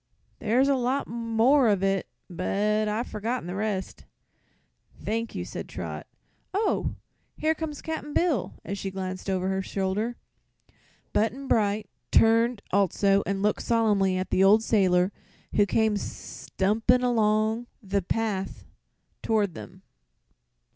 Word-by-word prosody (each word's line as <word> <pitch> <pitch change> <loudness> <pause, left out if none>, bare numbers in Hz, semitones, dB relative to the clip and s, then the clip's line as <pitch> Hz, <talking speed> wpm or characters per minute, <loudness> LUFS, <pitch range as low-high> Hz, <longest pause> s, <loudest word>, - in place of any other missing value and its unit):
"There's 250 +5 +2
a 280 - +4
lot 260 +2 0
more 235 +3 +3
of 200 -3 +2
it, 195 -1 +1 0.2
but 210 +4 0
I've 215 +3 -1
forgotten 230 +3 -3
the 180 - -5
rest." 200 -1 -3 0.9
"Thank 230 +2 -3
you," - - -3
said - - -7
Trot. - - -6 0.5
"Oh, 425 +2 0 0.4
here 315 +1 +2
comes 315 -2 -6
Cap'n 320 -2 -4
Bill!" 300 - 0
as 200 0 -4
she 195 - -3
glanced 185 0 -5
over 185 -1 0
her 190 0 0
shoulder. 200 +5 -2 1.0
Button 245 +6 0
Bright 210 -3 +1 0.2
turned 230 0 +4
also 195 +1 +3
and 195 0 -1
looked 210 - +1
solemnly 205 -5 +2
at 185 - -3
the 190 - +4
old 210 +3 +6
sailor 185 -4 +3 0.4
who 205 -1 +4
came 220 0 +2
stumping 220 +5 0
along 220 -1 +2 0.2
the 200 0 0
path 195 0 -2 0.6
toward 210 -5 +1
them. 185 +4 -11
210 Hz, 130 wpm, -27 LUFS, 195-235 Hz, 1.0 s, old